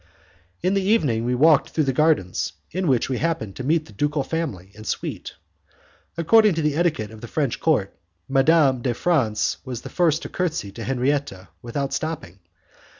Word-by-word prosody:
In 185 - +2
the 195 - +2
evening 150 - +1
we 125 +1 +1
walked 150 +2 +4
through 155 - 0
the 135 -2 0
gardens, 145 - +1 0.2
in 185 +1 -2
which 130 -4 +2
we 130 -2 -2
happened 155 - -2
to 130 - -6
meet 155 +3 +1
the 110 - -15
ducal 145 +5 0
family 125 - -4
and 110 0 -11
suite. - - -4 0.8
According 210 +3 +5
to 160 - -1
the 150 -1 +1
etiquette 155 -11 0
of 110 -1 -12
the 120 - -7
French 140 -2 -1
court, 130 -12 +1 0.3
Madame 135 -1 +4
de 120 -1 -1
France 125 -12 +1
was 125 -3 -6
the - - -7
first 165 -3 +1
to - - -6
curtsy 160 - -2
to 115 +3 -8
Henriette, 130 -7 -1
without 135 +3 -3
stopping. 155 - -4
140 Hz, 180 wpm, -23 LUFS, 115-160 Hz, 0.8 s, According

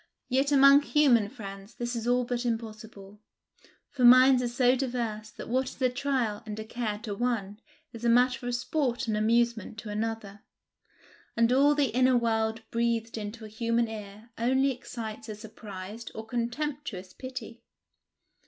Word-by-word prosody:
Yet 270 +2 +2
among 275 0 +7
human 265 -9 +3
friends 200 -3 -10
this 240 0 -3
is 230 0 -3
all 250 +1 +3
but 240 0 -2
impossible, 215 -3 -6 0.7
for 265 -3 -2
minds 255 +1 +8
are 245 - 0
so 245 +1 +3
diverse 235 -5 -3
that - - -10
what 255 +2 0
is - - -13
a 255 -1 +3
trial 250 -5 -1
and 215 -1 -6
a 220 - -5
care 220 -2 -3
to 210 - -4
one 210 -3 -2 0.3
is 230 0 -9
a 235 - +3
matter 250 +1 +3
of 245 - 0
sport 245 0 -1
and 220 - 0
amusement 225 0 +1
to 210 +1 -7
another; 210 -1 -4 1.0
and 230 +1 +4
all 285 +3 +5
the 275 -6 +1
inner 255 0 +4
world 225 -1 0
breathed 230 -1 0
into 220 +1 -6
a - - -7
human 230 +2 0
ear 215 +1 -9
only 265 +3 +2
excites 225 -3 -7
a 215 - -5
surprised 210 0 -9
or 220 - -6
contemptuous 240 -4 -4
pity. 255 -3 -8
235 Hz, 160 wpm, -28 LUFS, 215-250 Hz, 1.0 s, minds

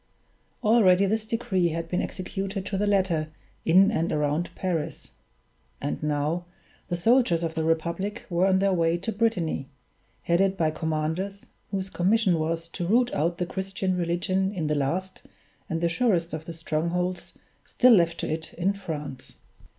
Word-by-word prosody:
Already 200 -4 +5
this 215 +2 -1
decree 195 -6 0
had 165 0 -3
been 180 - 0
executed 195 +1 -4
to 200 - -3
the 205 +2 0
letter 185 -6 +1 0.4
in 190 +5 +6
and 165 -4 0
around 150 +3 0
Paris; 170 -5 -3 0.7
and 145 - -3
now 150 +3 -1 0.4
the 175 - -2
soldiers 225 -4 +3
of 165 -1 -2
the 160 - -1
Republic 170 +7 -1
were 180 +1 +2
on 190 -1 +4
their 195 0 +2
way 165 -1 +2
to 190 +6 -3
Brittany, 195 -11 0 0.5
headed 190 +3 +2
by 160 -3 +2
commanders 160 +6 -3 0.2
whose 195 -1 -3
commission 190 -1 +2
was 165 +1 -2
to 175 0 -4
root 240 +5 +3
out 170 +4 0
the 180 - -1
Christian 190 0 -2
religion 180 +2 0
in 165 -4 -2
the 150 - +1
last 170 +7 -2 0.5
and 165 0 -2
the 170 - +3
surest 170 -3 +1
of 155 0 -5
the 170 - -6
strongholds 170 +3 -2 0.3
still 250 -1 +5
left 170 -5 +3
to - - -2
it 160 0 -4
in 185 +3 +1
France. 150 -9 -7
175 Hz, 160 wpm, -26 LUFS, 165-195 Hz, 0.7 s, in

